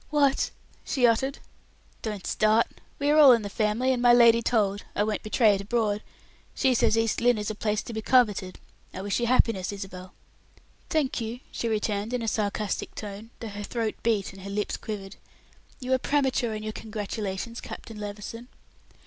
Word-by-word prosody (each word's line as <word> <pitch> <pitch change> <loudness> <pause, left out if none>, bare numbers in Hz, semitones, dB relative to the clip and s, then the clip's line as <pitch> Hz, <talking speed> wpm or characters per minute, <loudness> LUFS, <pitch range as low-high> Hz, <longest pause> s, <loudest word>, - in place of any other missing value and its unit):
"What!" 285 -2 +2 0.3
she 255 -4 +1
uttered. 265 +4 +2 0.6
"Don't 210 -4 -5
start. 215 +2 +3 0.3
We 285 +1 +1
are 305 - +5
all 280 -4 +10
in 230 -2 +1
the 205 - -5
family, 225 +5 +1
and 245 - -2
my 245 -1 +6
lady 235 -1 +6
told; 205 -4 +1
I 205 - +2
won't 215 0 -1
betray 215 0 +3
it 195 - -1
abroad. 210 -1 0 0.5
She 265 -2 +3
says 225 -1 +3
East 225 0 +1
Lynne 245 -1 +4
is 210 0 -2
a - - -4
place 210 0 -1
to 235 - -7
be 220 - -3
coveted; 210 -7 +2 0.4
I 190 - -5
wish 200 +2 0
you 240 - 0
happiness, 225 -6 +2
Isabel." 190 -2 -8 0.7
"Thank 295 -6 0
you," 230 +3 -5
she 235 - -3
returned 215 +1 -1
in 240 - -2
a - - -3
sarcastic 210 -1 -2
tone, 210 +1 -7
though 225 - -5
her 205 0 -7
throat 225 +1 -2
beat 210 -4 0
and 195 - -12
her 195 - -7
lips 205 +1 -2
quivered. 200 -2 -7 0.6
"You 260 -1 -1
are 260 - +3
premature 260 -5 +1
in 215 - -6
your 215 - -3
congratulations, 215 +1 -5
Captain 225 -3 -9
Levison." 210 +3 -7
220 Hz, 185 wpm, -27 LUFS, 205-240 Hz, 0.7 s, all